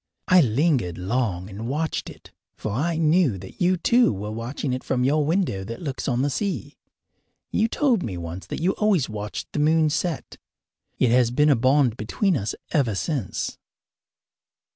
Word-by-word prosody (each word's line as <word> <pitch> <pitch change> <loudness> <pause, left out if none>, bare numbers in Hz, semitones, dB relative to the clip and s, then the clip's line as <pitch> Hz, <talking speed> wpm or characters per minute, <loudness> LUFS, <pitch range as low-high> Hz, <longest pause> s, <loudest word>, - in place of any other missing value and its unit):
I 185 -1 +7
lingered 130 - +1
long 95 -2 -1
and 105 +4 -6
watched 155 +4 -2
it, - - -14 0.3
for 110 - -4
I 155 +10 0
knew 160 - +3
that 95 +1 -12
you, 180 +1 +3
too, 240 +8 +4
were 105 +1 -5
watching 120 +4 -3
it 130 - -3
from 125 -1 0
your 150 +4 +2
window 155 - 0
that 115 +4 -7
looks 140 -4 -4
on 125 -1 +1
the 145 - 0
sea. 200 +6 -3 0.8
You 220 - +2
told 245 -4 +1
me 95 - -4
once 85 +2 -7
that - - -5
you 185 - +3
always 200 -10 +2
watched 105 -1 -6
the - - -2
moon 155 +1 +3
set. 165 0 -3 0.6
It 125 - +3
has 125 -1 +4
been 150 +5 +3
a - - +5
bond 130 -1 +3
between 180 - 0
us 105 -6 -2 0.2
ever 130 - +1
since. 130 - -3
135 Hz, 175 wpm, -24 LUFS, 110-165 Hz, 0.8 s, I